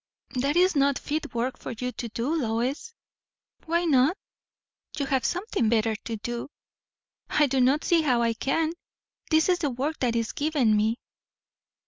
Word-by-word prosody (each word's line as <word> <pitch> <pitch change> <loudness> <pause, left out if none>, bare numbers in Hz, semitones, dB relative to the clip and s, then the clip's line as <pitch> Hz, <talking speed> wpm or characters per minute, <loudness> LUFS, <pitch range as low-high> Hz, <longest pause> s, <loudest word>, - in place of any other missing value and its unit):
"That 275 +4 0
is 365 0 +4
not 280 -1 +3
fit 305 +1 -3
work 245 +2 -2
for - - -6
you 250 0 -2
to 235 -1 -6
do, 235 +7 -2
Lois." 270 - -2 0.7
"Why 340 +2 +1
not?" 295 +3 +3 0.8
"You 285 - 0
have 265 -2 0
something 360 - 0
better 220 -1 +2
to 225 +1 -6
do." 240 +5 -5 0.8
"I 300 - +4
do 265 -1 +1
not 270 +5 +3
see 340 -2 +3
how 250 -6 +2
I 230 0 +2
can. 315 +7 0 0.6
This 315 0 +4
is 360 -1 +2
the 295 - 0
work 275 +5 -3
that 240 -2 0
is 230 -1 0
given 285 -8 +1
me." 220 +2 +1
270 Hz, 165 wpm, -26 LUFS, 235-315 Hz, 0.8 s, is